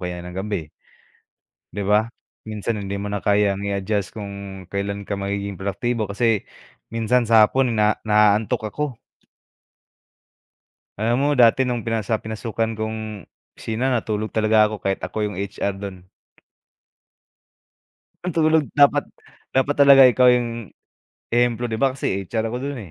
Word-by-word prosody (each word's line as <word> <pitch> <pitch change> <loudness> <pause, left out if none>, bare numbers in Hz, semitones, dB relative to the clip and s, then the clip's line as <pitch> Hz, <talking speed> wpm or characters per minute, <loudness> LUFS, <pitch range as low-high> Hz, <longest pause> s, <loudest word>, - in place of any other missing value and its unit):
kaya 90 -1 -5
ng 90 - -8
gabi, 95 -2 -3 1.1
'di 105 - -3
ba? 105 +3 +3 0.4
Minsan 105 0 -3
hindi 100 0 -4
mo 100 +1 -4
na 100 - -2
kayang 100 -1 +2
i-adjust 100 0 -2
kung 100 -2 -7
kailan 100 0 -3
ka 100 0 -4
magiging 100 -1 -3
produktibo 110 +3 -2
kasi 110 0 0 0.4
minsan 115 +1 +1
sa 110 -2 +7
hapon 125 +1 +1
na 105 0 +2
naantok 105 0 +2
ako. 145 -6 -3 2.0
Alam 115 +3 +1
mo 145 - +2
dati 125 0 +5
nung 120 -2 -2
pinasa 115 -1 -2
pinasukan 110 0 -3
kong 110 -3 -5 0.3
opisina 115 +4 -2
natulog 110 -3 -1
talaga 110 -1 +3
ako 110 - -4
kahit 95 -1 -2
ako - - -6
yung 105 -2 -4
HR 100 0 -3
don. 95 -2 -8 2.2
Ang 180 - -2
tulog 160 -1 +3
dapat 145 -1 +4 0.5
dapat 135 +2 +1
talaga 140 -1 +8
ikaw 125 0 +5
yung 120 -4 -2 0.6
ehemplo 120 0 +2
'di 110 -2 -3
ba 135 -1 +2
kasi 95 -7 -2
HR 110 -1 -1
ako 125 - -2
do'n, 140 -1 -4
110 Hz, 140 wpm, -22 LUFS, 100-120 Hz, 2.2 s, talaga